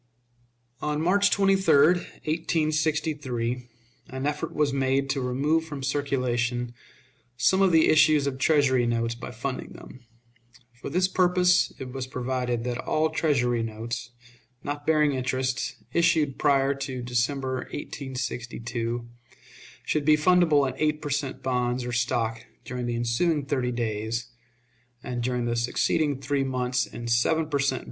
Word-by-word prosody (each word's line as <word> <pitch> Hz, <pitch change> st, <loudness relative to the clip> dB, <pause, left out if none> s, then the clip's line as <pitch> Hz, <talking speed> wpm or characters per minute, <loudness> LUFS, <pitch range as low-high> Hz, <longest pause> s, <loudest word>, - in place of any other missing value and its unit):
On 150 Hz, 0 st, -1 dB
March 200 Hz, +5 st, +3 dB
23, 195 Hz, -5 st, +3 dB
1863, 150 Hz, -7 st, -1 dB, 0.4 s
an 130 Hz, +1 st, -4 dB
effort 150 Hz, 0 st, -2 dB
was 150 Hz, -2 st, +1 dB
made 135 Hz, 0 st, +1 dB
to 135 Hz, -1 st, -1 dB
remove 145 Hz, +6 st, +1 dB
from 145 Hz, -4 st, -7 dB
circulation 125 Hz, -3 st, -1 dB, 0.6 s
some 140 Hz, +11 st, +3 dB
of 190 Hz, -2 st, +4 dB
the 160 Hz, -1 st, +5 dB
issues 155 Hz, -2 st, +5 dB
of 135 Hz, -2 st, -3 dB
Treasury 130 Hz, -4 st, +3 dB
notes 115 Hz, 0 st, 0 dB
by 120 Hz, +1 st, -8 dB
funding 125 Hz, +3 st, -5 dB
them. 130 Hz, -, -13 dB, 0.7 s
For 120 Hz, -, -8 dB
this 180 Hz, +5 st, +2 dB
purpose 180 Hz, -1 st, +3 dB
it 125 Hz, -1 st, -7 dB
was 130 Hz, -1 st, -4 dB
provided 125 Hz, -2 st, -2 dB
that 120 Hz, 0 st, -3 dB
all 155 Hz, 0 st, 0 dB
Treasury 125 Hz, -6 st, +1 dB
notes, 115 Hz, +2 st, -5 dB, 0.5 s
not 145 Hz, 0 st, -5 dB
bearing 150 Hz, -2 st, +4 dB
interest, 130 Hz, +1 st, -2 dB, 0.2 s
issued 165 Hz, -5 st, +2 dB
prior 140 Hz, -1 st, +3 dB
to 135 Hz, -2 st, -5 dB
December, 130 Hz, +2 st, -1 dB
1862, 120 Hz, -4 st, -4 dB, 0.8 s
should 155 Hz, -, 0 dB
be 150 Hz, +1 st, +5 dB
fundable 155 Hz, -4 st, +4 dB
in 130 Hz, -, -3 dB
eight 150 Hz, 0 st, +1 dB
per 145 Hz, -, -3 dB
cent. 135 Hz, -2 st, -2 dB
bonds 125 Hz, -1 st, 0 dB
or 125 Hz, -, -3 dB
stock 115 Hz, -1 st, -1 dB, 0.2 s
during 125 Hz, -1 st, -4 dB
the 120 Hz, -, -1 dB
ensuing 135 Hz, +6 st, 0 dB
thirty 130 Hz, -3 st, -1 dB
days, 115 Hz, 0 st, -3 dB, 0.7 s
and 125 Hz, -1 st, -3 dB
during 125 Hz, 0 st, -1 dB
the 120 Hz, 0 st, 0 dB
succeeding 135 Hz, +4 st, 0 dB
three 140 Hz, +1 st, 0 dB
months 125 Hz, -1 st, -1 dB
in 120 Hz, +2 st, -7 dB
seven 135 Hz, +7 st, +2 dB
per 145 Hz, -2 st, -1 dB
cent. 135 Hz, -1 st, +1 dB
130 Hz, 140 wpm, -26 LUFS, 120-150 Hz, 0.8 s, the